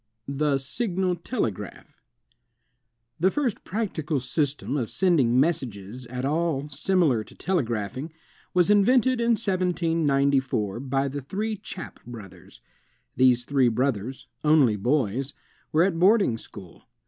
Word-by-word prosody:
The 140 0 +1
Signal 185 - -1
Telegraph 170 - -5 1.2
The 185 +4 +4
first 250 -1 -2
practical 170 -9 -2
system 145 +2 -2
of 125 -6 -1
sending 140 -10 +3
messages 125 - -2
at 125 +2 -4
all 150 -1 -1
similar 150 - +1
to - - -17
telegraphing, 130 - -2 0.4
was 180 +2 +3
invented 245 +4 +4
in 235 0 +3
1794 150 - +1
by 135 +1 -1
the 140 +1 -4
three 210 +10 -3
Chappe 190 -3 -9
brothers. 100 -7 -12 0.5
These 125 -1 +4
three 135 -2 +3
brothers, 125 0 -2 0.2
only 150 -8 +4
boys, 130 +3 -1 0.4
were 160 +2 +4
at 180 -3 0
boarding 190 - +4
school. 95 -7 -13
145 Hz, 115 wpm, -25 LUFS, 125-180 Hz, 1.2 s, The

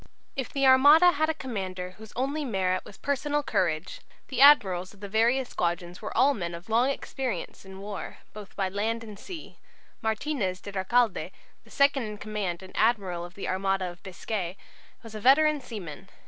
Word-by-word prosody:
If 265 -4 -3
the 275 -1 +1
Armada 290 +7 +7
had 315 0 0
a - - +2
commander 190 -9 -5
whose 220 -1 -11
only 275 +5 -1
merit 185 -7 0
was 200 - -13
personal 290 +1 -1
courage, 170 - -1 0.3
the 260 -1 -1
admirals 195 -10 +6
of - - -20
the 200 - -6
various 235 +5 +2
squadrons 175 +1 -2
were 215 - -5
all 280 +2 +5
men 170 -7 -4
of 170 +5 -12
long 235 +4 +3
experience 260 -9 -4
in 190 0 -10
war, 200 +1 -7 0.2
both 210 -2 -11
by 195 - 0
land 220 +4 -2
and 210 -3 -10
sea. 350 -5 -9 0.4
Martinez 220 -4 -1
de 200 - -8
Recalde, 205 +3 +1 0.3
the - - -21
second 280 -1 +3
in 210 -2 -5
command 205 -4 -4
and 190 - -13
admiral 195 -7 +1
of 175 +1 -10
the 200 - -5
armada 190 -1 0
of 175 0 -16
Biscay, 190 -1 -4 0.5
was 225 -1 -11
a 215 - -5
veteran 295 +5 +5
seaman. 195 - -8
210 Hz, 180 wpm, -27 LUFS, 185-265 Hz, 0.5 s, Armada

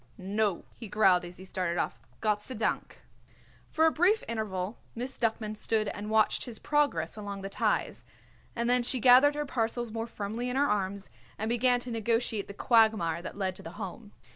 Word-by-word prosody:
"No," 200 0 -1
he 230 - -9
growled 190 -3 +4
as 175 0 -9
he 185 - -9
started 180 -2 -2
off. - - -2 0.2
"Gott 210 -1 +1
sei 255 +4 -5
dank." 215 0 -2 0.7
For 320 - +2
a 320 - +5
brief 370 +8 +3
interval 210 -3 -3 0.2
Miss 250 +3 -3
Duckman 220 -2 -1
stood 215 -1 +1
and 210 +1 -6
watched 215 -1 +3
his 240 -4 -7
progress 295 +3 0
along 200 -2 -6
the 195 - -4
ties, - - -1 0.5
and 235 0 -1
then 250 0 +4
she 245 +1 +1
gathered 260 +5 +7
her 295 0 -2
parcels 240 -2 -1
more 225 +1 -3
firmly 225 +3 -4
in 250 - -3
her 280 +2 +3
arms 200 -2 -2 0.3
and 220 +1 -2
began 245 +1 +3
to 245 - -7
negotiate 230 -1 -1
the 200 - -8
quagmire 215 -9 +3
that - - -8
led 190 -2 -1
to - - -9
the 165 - -9
Home. 205 +1 -7
220 Hz, 190 wpm, -29 LUFS, 200-245 Hz, 0.7 s, gathered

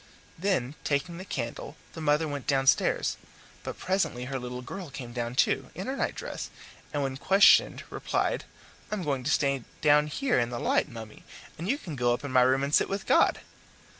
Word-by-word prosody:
Then, 165 -8 0
taking 155 +4 -1
the - - -6
candle, 125 -2 -5 0.2
the 160 - -7
mother 150 +1 +2
went 145 -2 -5
downstairs; 135 -2 +2 0.4
but - - -6
presently 160 -10 -1
her 135 0 -3
little 125 0 -6
girl 180 +5 -7
came 125 -3 -8
down 120 0 -3
too, - - +2
in 190 - -5
her 265 - -2
nightdress, - - -3 0.4
and, 145 -2 -1
when 135 -1 -3
questioned, 195 +8 +5
replied, - - -1 0.4
"I'm 210 -3 -3
going 140 -4 -1
to - - 0
stay 140 -4 +1 0.2
down 150 0 +5
here 250 - +1
in 120 -1 0
the 120 - -4
light, - - +1
mummy, 110 -2 -10 0.3
and 170 +5 -5
you 275 - +2
can 170 - -7
go 120 -2 +2
up - - -10
to 145 - -5
my 130 -1 +5
room 130 +2 +3
and 140 +1 -2
sit - - +4
with 195 0 -3
God." - - +4
140 Hz, 195 wpm, -28 LUFS, 125-170 Hz, 0.4 s, questioned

